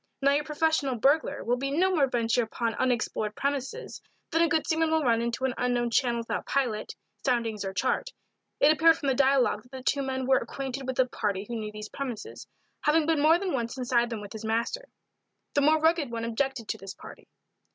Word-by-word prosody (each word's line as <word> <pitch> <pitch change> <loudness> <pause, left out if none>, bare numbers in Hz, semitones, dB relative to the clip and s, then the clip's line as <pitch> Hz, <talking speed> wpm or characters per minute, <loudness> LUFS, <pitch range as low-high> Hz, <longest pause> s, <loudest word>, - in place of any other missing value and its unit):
Now 275 0 +3
your 290 +1 +1
professional 300 -3 0
burglar 275 +7 +2
will 245 +1 0
no 290 +8 +1
more 300 -7 +3
venture 240 -1 +1
upon 230 0 -2
unexplored 220 -3 -1
premises 280 - -3 0.3
than 330 - +2
a 335 - +5
good 320 -2 +1
seaman 320 0 +1
will 320 -1 +2
run 230 -3 +3
into 235 +2 -2
an 260 - 0
unknown 245 -1 0
channel 235 -1 +1
without 230 - -4
pilot, 245 -6 -1 0.3
soundings 230 -5 0
or 195 - -3
chart. 255 - -1 0.5
It 290 - +6
appeared 325 +1 +5
from 280 - -1
the - - +3
dialogue 270 -1 +3
that 250 - -23
the 260 -1 -8
two 280 +1 +1
men 265 -1 -2
were 265 0 +4
acquainted 270 -1 -5
with 260 - -3
a 260 - +4
party 205 -5 -2
who 240 - -4
knew 215 -2 -4
these 210 0 -8
premises, 255 -6 -6 0.3
having 305 +1 +3
been 320 -2 +2
more 315 +3 +6
than 370 -1 -3
once 235 -1 -2
inside 240 -2 +1
them 225 -3 -4
with 205 +1 -9
his 220 0 -7
master. 235 - -1 0.7
The 285 - +3
more 310 +2 +4
rugged 320 -3 +2
one 230 -1 -4
objected 235 0 -2
to - - -3
this 195 0 -8
party. - - -13
260 Hz, 210 wpm, -28 LUFS, 235-295 Hz, 0.7 s, It